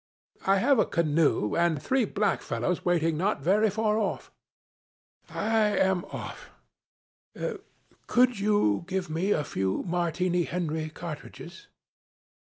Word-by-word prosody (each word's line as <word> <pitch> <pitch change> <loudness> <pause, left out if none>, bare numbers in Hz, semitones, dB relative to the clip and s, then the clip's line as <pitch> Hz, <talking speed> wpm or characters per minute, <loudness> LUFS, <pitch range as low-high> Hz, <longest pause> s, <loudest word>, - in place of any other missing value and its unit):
'I 195 +1 +5
have 270 +5 +3
a - - +4
canoe 155 -9 +1
and 170 -3 +2
three 260 - +1
black 205 0 0
fellows 180 - -2
waiting 165 -3 +1
not 190 -2 0
very 210 +6 +3
far. 215 0 0 1.1
I 215 -1 +1
am 190 -1 +2
off. - - -8 1.6
Could 250 -3 +3
you 200 - +2
give 185 -3 -3
me 170 +5 -1
a 150 - +2
few 95 -6 -2
Martini 175 0 0
Henry 160 -3 -3
cartridges?' 155 -1 -9
180 Hz, 115 wpm, -27 LUFS, 160-210 Hz, 1.6 s, I